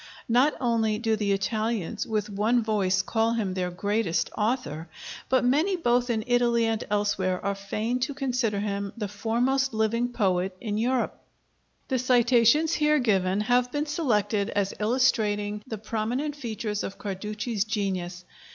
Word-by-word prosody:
Not 250 +6 +3
only 225 -4 +1
do 225 -1 +1
the 210 -2 -1
Italians 215 0 -1
with 215 -2 -1
one 215 +4 +1
voice 190 -3 +1
call 225 +2 +1
him 210 -5 -1
their 180 -1 -1
greatest 200 0 -1
author, 210 - -2 0.4
but 260 -1 +3
many 310 +10 +2
both 245 -7 +1
in 220 -2 0
Italy 240 -1 +2
and 225 -1 -1
elsewhere 200 -3 0
are 200 - +1
fain 210 +5 -2
to 275 +2 -2
consider 250 -7 -1
him 200 -1 -3
the 210 -3 -2
foremost 240 +5 0
living 230 +3 +1
poet 190 -5 0
in 210 -2 -3
Europe. 250 +2 0 0.7
The 260 -2 0
citations 250 +5 +4
here 300 -2 +3
given 195 -6 +1
have 245 +3 +2
been 290 +2 -1
selected 225 -10 0
as 200 -1 -1
illustrating 210 -3 +1
the 220 - -4
prominent 230 +7 -2
features 220 -6 -4
of 195 - -5
Carducci's 210 +2 -3
genius. 185 -5 -3
220 Hz, 150 wpm, -26 LUFS, 205-245 Hz, 0.7 s, citations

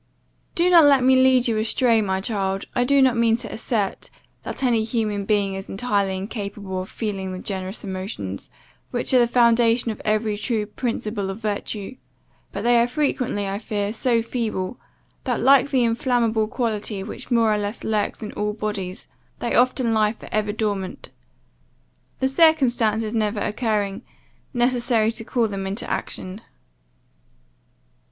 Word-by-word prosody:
"Do 345 +1 +3
not 335 -3 +8
let 275 -3 +5
me 260 +1 +5
lead 260 -1 +4
you 225 -2 +1
astray, 230 +1 +2
my 190 -2 -1
child, 195 -2 -2
I 245 - +2
do 275 +2 +4
not 255 -2 +4
mean 230 -1 +3
to - - -7
assert, 220 -3 -2 0.3
that - - -5
any 235 -4 +3
human 215 -3 -1
being 200 -2 +1
is 195 0 -6
entirely 200 -3 0
incapable 200 -2 -5
of 185 - -8
feeling 195 -4 -4
the 185 - -5
generous 190 +1 -5
emotions, 185 - -5 0.4
which 240 +1 -1
are 255 - +7
the 240 - +4
foundation 235 -1 +3
of 215 - -8
every 215 0 0
true 215 0 -1
principle 210 -2 -3
of 195 - -4
virtue; 210 +1 -4 0.5
but - - -5
they 240 0 +4
are 235 - +2
frequently, 250 -6 -1
I 195 +1 -3
fear, 210 -2 -2
so 235 -1 +1
feeble, 230 -3 -3 0.5
that, 245 -4 0
like 275 +2 +5
the 260 -3 +2
inflammable 230 -2 +1
quality 215 -4 -2
which - - -8
more 230 -3 +3
or 210 - 0
less 205 +2 -4
lurks 215 0 -1
in 210 - -5
all 210 0 -2
bodies, 205 -4 -4 0.3
they 235 - -3
often 250 -1 +3
lie 215 -1 +2
for - - -13
ever 210 -1 0
dormant; 205 -3 -3 1.1
the 265 - +2
circumstances 245 -8 +3
never 215 -2 0
occurring, 210 -2 -1 0.5
necessary 240 -3 +1
to 230 0 -6
call 235 0 0
them 195 -2 -4
into 195 +4 -3
action. 185 +4 -4
220 Hz, 160 wpm, -23 LUFS, 205-240 Hz, 1.1 s, not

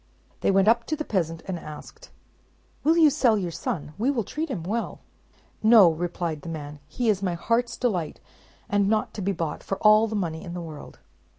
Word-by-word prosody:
They - - +1
went 195 +1 +3
up 230 +1 +4
to 310 - 0
the 305 0 -5
peasant, 165 -5 -2
and 185 -3 -4
asked, 310 - -11 0.7
"Will 320 +3 +4
you 315 -3 +6
sell 245 -6 +3
your 180 -4 -2
son? 150 -2 -4
We 240 +5 +2
will 250 -6 0
treat 310 - -4
him 205 -11 -4
well." 220 +7 -3 0.6
"No," 215 -6 +7
replied 170 -1 -3
the 165 - -8
man; 150 -2 -7
"he 245 +6 -2
is 205 -3 +2
my 180 -3 -1
heart's 230 +7 0
delight, 185 -11 -1 0.5
and 200 -1 +2
not 215 0 0
to 210 - -6
be 195 +1 0
bought 165 -4 -3
for 195 - -4
all 215 +1 +5
the 220 - -4
money 165 -5 -3
in 175 0 -7
the - - -4
world!" 155 -3 -10
195 Hz, 205 wpm, -25 LUFS, 170-230 Hz, 0.7 s, No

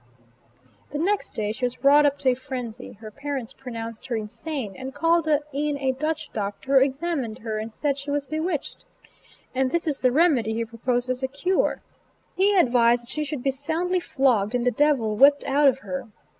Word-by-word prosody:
The 290 - -4
next 395 +6 -1
day 210 -1 -1
she 225 +4 -8
was 245 +2 -2
wrought 290 +1 +7
up 285 0 0
to 280 -2 +2
a - - +4
frenzy. 250 -2 -6
Her 215 +1 -11
parents 275 -1 -5
pronounced 230 -3 -7
her 245 - -1
insane, 220 +1 -4
and 265 +5 -7
called 330 +2 +2
in 295 -1 0
a 265 -1 0
Dutch 305 +4 -3
doctor 215 +6 +1
who - - +6
examined 270 -4 -2
her 220 -1 -4
and 220 +1 -5
said 280 +4 -1
she 280 +1 -7
was 285 0 -1
"bewitched!" 315 +1 -3 0.7
And 260 0 +1
this 340 +5 0
is 300 -4 -1
the 255 - +3
remedy 260 -7 +3
he 230 0 -1
proposed 240 +2 -2
as 255 0 -2
a 265 - 0
cure; 320 +8 0 0.5
he 400 +2 +3
advised 240 -6 +4
that 235 - -16
she 305 - -2
should 290 -3 -5
be 270 - +2
soundly 325 +7 -1
flogged, 250 - +1
and 245 0 0
the 250 - +3
devil 250 -5 +2
whipped 285 +3 +6
out 285 +1 +3
of 265 -1 +4
her. 270 -3 -4
270 Hz, 200 wpm, -24 LUFS, 240-295 Hz, 0.7 s, wrought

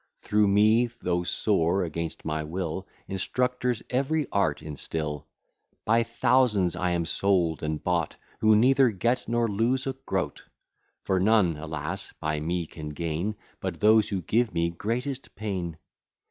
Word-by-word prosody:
Through 105 0 +2
me, 110 +4 +4
though 90 -7 -2
sore 90 0 +1
against 85 -1 -4
my 75 0 -1
will, 90 +3 -4 0.2
Instructors 125 +4 -1
every 140 +4 +1
art 80 -7 +1
instil. 75 0 -4 0.6
By 115 +2 +4
thousands 115 -6 +2
I 90 0 0
am 85 -1 0
sold 85 -2 +1
and 75 0 -3
bought, 85 -3 0 0.2
Who 110 0 +5
neither 130 +3 +5
get 115 +5 0
nor 120 0 +1
lose 115 +5 0
a 135 - -1
groat; 135 - -3 0.6
For 95 -1 +1
none, 95 -4 +4
alas! 75 0 -5
by 75 0 -1
me 85 +3 -1
can 75 -1 -8
gain, 85 +7 -2 0.2
But 90 -4 -4
those 110 0 +5
who 95 -3 -2
give 115 -1 +1
me 85 0 +1
greatest 125 +9 -4
pain. 95 -7 -4
95 Hz, 145 wpm, -27 LUFS, 85-115 Hz, 0.6 s, Who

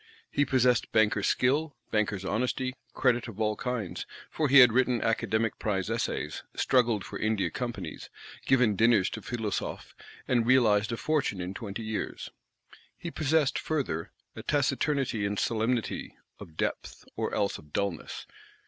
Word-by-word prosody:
He 145 - +2
possessed 125 -3 +2
banker's 105 -2 +3
skill, 145 +4 +1 0.2
banker's 105 -3 0
honesty; 125 +4 -1 0.2
credit 125 -2 +2
of 110 -3 -9
all 110 -1 +1
kinds, 115 -7 -4 0.2
for 155 -3 0
he 140 - +7
had 125 -4 +9
written 125 -1 +3
Academic 110 0 0
Prize 100 -1 -1
Essays, 75 -9 -2
struggled 120 -5 +2
for - - -7
India 110 -2 0
Companies, 120 -2 -5 0.4
given 125 -5 +4
dinners 110 -2 +4
to - - -6
Philosophes, 115 -4 -4 0.3
and 120 -2 +2
"realised 110 -5 +4
a 115 - -2
fortune 150 -11 0
in 90 +1 -4
twenty 105 +1 -6
years." 110 -1 -4 0.7
He 170 - -6
possessed, 155 -2 +1
further, 135 - -2 0.2
a - - -6
taciturnity 135 -4 0
and 100 0 -1
solemnity; 115 +2 -1 0.2
of 80 - -12
depth, - - -3
or - - -2
else 100 -1 0
of 75 - -17
dulness. 100 -3 -3
115 Hz, 145 wpm, -29 LUFS, 105-130 Hz, 0.7 s, had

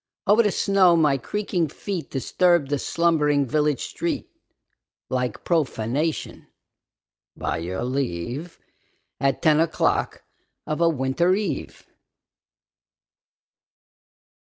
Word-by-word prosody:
Over 210 +4 +5
the 210 -3 +1
snow 190 -4 +4
my 150 -4 +3
creaking 185 - -1
feet 180 +4 -5
Disturbed 170 +2 +1
the 145 - +1
slumbering 150 -4 +2
village 150 +1 0
street - - -3 0.8
Like 125 -1 -2
profanation, 150 -1 -1 0.9
by - - -2
your 90 +5 -4
leave, 130 - -3 0.6
At 135 +2 0
ten 155 -2 +5
o'clock 165 0 0 0.4
of 155 +2 -3
a 170 - +5
winter 155 +5 +1
eve. 210 +1 -4
150 Hz, 95 wpm, -24 LUFS, 135-175 Hz, 0.9 s, Over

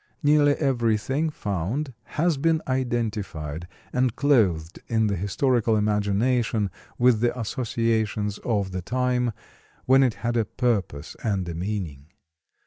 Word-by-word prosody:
Nearly 145 0 +5
everything 130 +2 +1
found 115 - -3 0.2
has 165 -1 +2
been 160 +2 +1
identified 105 - -2 0.3
and 125 -2 +1
clothed 95 - +2
in 110 -1 +2
the 100 -1 +1
historical 115 +4 +1
imagination 105 +1 +1 0.3
with 120 -2 +4
the 120 +2 0
associations 110 -3 -1
of 100 -5 -1
the 95 0 -3
time 125 +3 0 0.5
when 135 +1 +6
it 125 -5 +2
had 120 0 +1
a 115 - +2
purpose 100 - -2
and 100 -5 -1
a 85 - -4
meaning. 85 -6 -4
115 Hz, 125 wpm, -25 LUFS, 100-130 Hz, 0.5 s, when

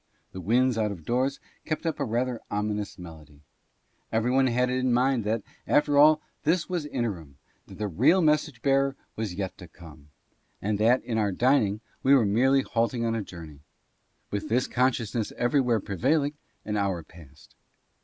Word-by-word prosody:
The 95 - -7
winds 120 +5 +2
out 105 -1 0
of 85 -6 -9
doors 130 +3 0 0.2
kept 155 +1 -3
up 160 -2 -2
a - - 0
rather 120 +1 -2
ominous 105 0 -3
melody. 80 -5 -12 0.7
Everybody 125 +3 +2
had 125 +1 +2
it 130 - 0
in 130 0 +1
mind 125 0 +2
that, 110 0 -1 0.2
after 145 0 +3
all, 150 +2 +6 0.2
this 165 +3 +1
was 175 -5 -3
interim, 95 - -4 0.3
that - - -12
the 105 - -2
real 130 - +3
message 150 -4 +1
bearer 135 0 +2 0.2
was 105 -5 -4
yet 95 -1 -4
to 90 - -10
come, 80 -3 -15 0.5
and 105 0 -2
that, 120 +4 +3
in 115 -2 -2
our 105 -2 +1
dining, 110 -1 +2 0.2
we 135 +1 +5
were 125 -5 +4
merely 130 +6 +3
halting 115 +1 -1
on 115 - 0
a 115 - -1
journey. 80 -7 -10 0.7
With 100 0 -3
this 125 +3 +2
consciousness 120 -3 0
everywhere 120 -2 +2
pre 100 -1 -6
vailing, 145 - +2 0.3
an 105 0 -2
hour 95 -4 -1
passed. 75 -4 -17
115 Hz, 175 wpm, -27 LUFS, 100-135 Hz, 0.7 s, all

